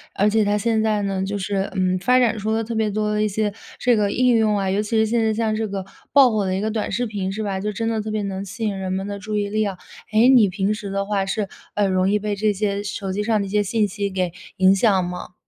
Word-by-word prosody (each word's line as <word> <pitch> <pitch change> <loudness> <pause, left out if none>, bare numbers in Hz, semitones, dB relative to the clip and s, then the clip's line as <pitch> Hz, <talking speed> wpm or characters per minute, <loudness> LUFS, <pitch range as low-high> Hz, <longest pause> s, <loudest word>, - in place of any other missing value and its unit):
而 205 - +3
且 220 0 +3
它 205 +1 +1
现 220 +1 +1
在 215 -1 +1
呢， 195 -1 -1
就 200 +1 -2
是， 195 0 -2
嗯， 185 -1 +1
发 250 +7 +3
展 230 -3 +3
出 215 - -3
了 225 0 0
特 230 +1 -5
别 220 -1 +1
多 210 +1 -1
的 210 - 0
一 - - +2
些 210 0 -1 0.3
这 245 -1 +3
个 205 -1 +1
应 250 -1 +3
用 215 -2 +2
啊。 195 -1 -1
尤 200 - +1
其 215 +1 -1
是 220 - +4
现 230 +1 +1
在 220 - +2
像 220 0 0
这 220 0 -1
个 195 -1 -5 0.3
爆 275 -4 +6
火 215 -2 0
的 185 0 -1
一 - - -1
个 220 0 -1
短 220 -1 -2
视 245 +5 0
频， 200 -3 -3
是 215 +2 -4
吧， 195 -2 -2
就 210 +2 -2
真 225 +2 -3
的 225 -1 0
特 215 - -5
别 215 -1 -1
能 195 0 -4
吸 200 +4 -7
引 205 -2 -1
人 190 -1 -3
们 190 +1 -2
的 200 0 -5
注 210 +1 -3
意 205 -1 -1
力 215 +1 0
啊。 195 -3 -3 0.3
哎， 220 +3 +5
你 225 -6 +6
平 195 +2 0
时 205 -2 -6
的 195 0 -2
话 200 -1 0
是， 205 +1 -2 0.3
呃， 205 -1 +2
容 185 0 +2
易 210 - +3
被 210 0 -2
这 210 +1 +1
些 200 0 -1
手 195 -1 -4
机 210 +2 -1
上 220 -1 +1
的 200 - -1
一 - - -7
些 210 +1 +2
信 210 +1 +1
息 200 0 -3
给 185 -3 -2 0.2
影 190 +1 +5
响 195 -4 +3
吗？ 180 0 -7
210 Hz, 320 characters per minute, -22 LUFS, 195-220 Hz, 0.3 s, 爆